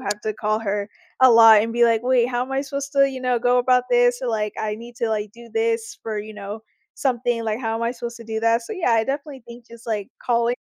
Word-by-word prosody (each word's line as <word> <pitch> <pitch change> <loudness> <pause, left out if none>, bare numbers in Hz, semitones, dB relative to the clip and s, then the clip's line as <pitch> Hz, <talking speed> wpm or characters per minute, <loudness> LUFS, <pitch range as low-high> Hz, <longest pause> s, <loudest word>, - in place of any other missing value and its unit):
have 205 +1 -3
to 215 - -2
call 215 0 -1
her 205 -1 -2 0.3
a 260 - +8
lot 225 -2 +8
and 225 +2 -2
be 240 0 +3
like, 230 -1 +2
"Wait, 250 -1 +3
how 245 0 -1
am 265 - -6
I 270 0 0
supposed 280 0 -5
to, 275 0 +4
you 260 -1 -7
know, 250 -1 +1
go 245 +1 +2
about 250 0 +3
this?" 245 +1 +3
Or 250 - -2
like, 210 -2 -2
"I 210 -1 -2
need 235 +2 -11
to, 230 - -1
like, 210 -1 -2
do 235 +1 -14
this 225 0 -1
for, 220 -1 -4
you 215 +1 -7
know, 210 +1 -8 0.3
something, 240 -3 -1
like, 220 0 -1
how 225 -2 -2
am 225 - -3
I 230 - 0
supposed 235 -1 -7
to 230 - -11
do 220 0 -4
that?" 230 +1 +2
So, 230 - -7
yeah, 350 - 0
I 225 -1 +3
definitely 275 0 -5
think 235 0 -12
just, 235 0 -15
like, 210 -3 -3 0.2
callin 235 0 +1
235 Hz, 270 wpm, -22 LUFS, 220-245 Hz, 0.3 s, a